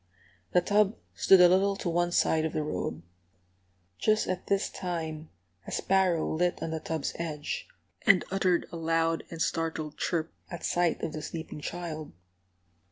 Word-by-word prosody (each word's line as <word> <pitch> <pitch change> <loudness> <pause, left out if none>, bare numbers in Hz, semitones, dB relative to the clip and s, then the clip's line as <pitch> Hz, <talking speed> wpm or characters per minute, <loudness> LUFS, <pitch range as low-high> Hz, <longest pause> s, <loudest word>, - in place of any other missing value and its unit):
The 180 - +5
tub 205 +3 +3 0.2
stood 190 - +6
a 180 - +9
little 195 +2 +3
to 195 - -5
one 175 +1 +1
side 160 -2 +3
of 160 - -2
the 155 - 0
road. 90 - -3 1.0
Just 215 0 +2
at 185 0 -3
this 195 0 +2
time 160 -4 -4 0.4
a - - -6
sparrow 185 -4 +2
lit 175 +2 0
on 160 - -3
the 160 - -2
tub's 160 -2 -3
edge, 150 -3 -4 0.4
and 200 -4 +6
uttered 185 -2 +2
a 170 - -5
loud 165 0 +1
and 165 - -8
startled 160 -2 -2
chirp 165 -2 -1 0.2
at 175 - -7
sight 175 -1 +1
of 155 - -2
the 155 - -4
sleeping 160 0 -6
child. 160 - -5
170 Hz, 165 wpm, -29 LUFS, 160-180 Hz, 1.0 s, a